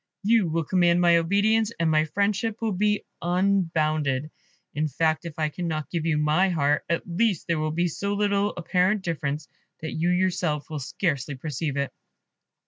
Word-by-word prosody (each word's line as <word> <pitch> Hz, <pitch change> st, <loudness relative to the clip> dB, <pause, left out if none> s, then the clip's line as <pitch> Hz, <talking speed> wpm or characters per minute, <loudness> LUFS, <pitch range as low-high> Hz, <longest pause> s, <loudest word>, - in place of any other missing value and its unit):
You 215 Hz, -4 st, +3 dB
will 165 Hz, +1 st, 0 dB
command 175 Hz, +1 st, +3 dB
my 170 Hz, -1 st, +5 dB
obedience, 205 Hz, +6 st, +2 dB
and 165 Hz, -1 st, +2 dB
my 155 Hz, 0 st, +3 dB
friendship 205 Hz, +5 st, -1 dB
will 225 Hz, -1 st, -1 dB
be 210 Hz, +2 st, 0 dB, 0.2 s
unbounded. 160 Hz, -6 st, +1 dB, 0.4 s
In 155 Hz, +1 st, 0 dB
fact, 160 Hz, +3 st, 0 dB
if 165 Hz, -3 st, -7 dB
I 155 Hz, -1 st, 0 dB
cannot 160 Hz, -2 st, -4 dB
give 165 Hz, -2 st, -2 dB
you 155 Hz, -2 st, +2 dB
my 150 Hz, +6 st, +2 dB
heart, 150 Hz, -4 st, +1 dB
at 170 Hz, -, 0 dB
least 190 Hz, +1 st, 0 dB
there 165 Hz, -2 st, 0 dB
will 155 Hz, 0 st, 0 dB
be 170 Hz, +3 st, 0 dB
so 200 Hz, +5 st, -2 dB
little 205 Hz, 0 st, +1 dB
apparent 185 Hz, +4 st, +1 dB
difference, 150 Hz, -3 st, -3 dB, 0.3 s
that 160 Hz, -, -4 dB
you 165 Hz, +2 st, 0 dB
yourself 180 Hz, -4 st, 0 dB
will 155 Hz, -, -3 dB
scarcely 145 Hz, -3 st, -2 dB
perceive 145 Hz, +1 st, -4 dB
it." 140 Hz, -1 st, -2 dB
170 Hz, 170 wpm, -25 LUFS, 155-195 Hz, 0.4 s, my